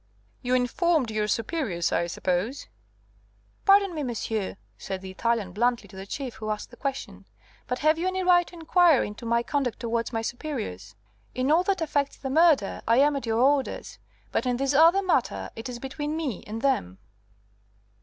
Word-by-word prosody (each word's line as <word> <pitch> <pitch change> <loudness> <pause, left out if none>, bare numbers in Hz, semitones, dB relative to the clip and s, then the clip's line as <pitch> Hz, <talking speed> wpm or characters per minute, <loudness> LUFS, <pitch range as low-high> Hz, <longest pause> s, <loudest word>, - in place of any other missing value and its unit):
"You 250 0 +1
informed 255 +1 +1
your 215 -1 0
superiors, 215 - -1
I 170 - +1
suppose?" 185 +9 -2 1.0
"Pardon 395 -2 +5
me, 310 - -3
monsieur," 220 -6 -3 0.2
said 190 -1 -6
the 190 - -7
Italian 225 -1 -1
blandly 240 +5 0
to 195 - -14
the 190 +1 -8
Chief, 260 +2 -5
who 215 0 -5
asked 210 +2 -4
the - - -12
question, 275 +1 -5 0.4
"but 250 - -1
have 310 +1 +4
you 355 - 0
any 375 0 -1
right 355 -1 +4
to - - -13
inquire 335 -3 +4
into 210 +3 -7
my 235 +1 +2
conduct 260 -4 -1
towards 230 0 -2
my 225 -1 -2
superiors? 220 - -5 0.4
In 255 +3 +1
all 325 +3 +5
that 385 -3 0
affects 285 -3 -1
the 265 - -5
murder 310 - +3
I 230 +1 +4
am 290 +2 +4
at 270 -4 -4
your 225 +1 +1
orders, 275 +1 +1 0.3
but - - 0
in 245 -1 +1
this 275 +1 0
other 335 +7 +6
matter 370 - 0
it 225 +3 -6
is 245 - -5
between 295 +4 -4
me 280 - -3
and 220 +2 -6
them." 95 - 0
255 Hz, 185 wpm, -26 LUFS, 225-310 Hz, 1.0 s, other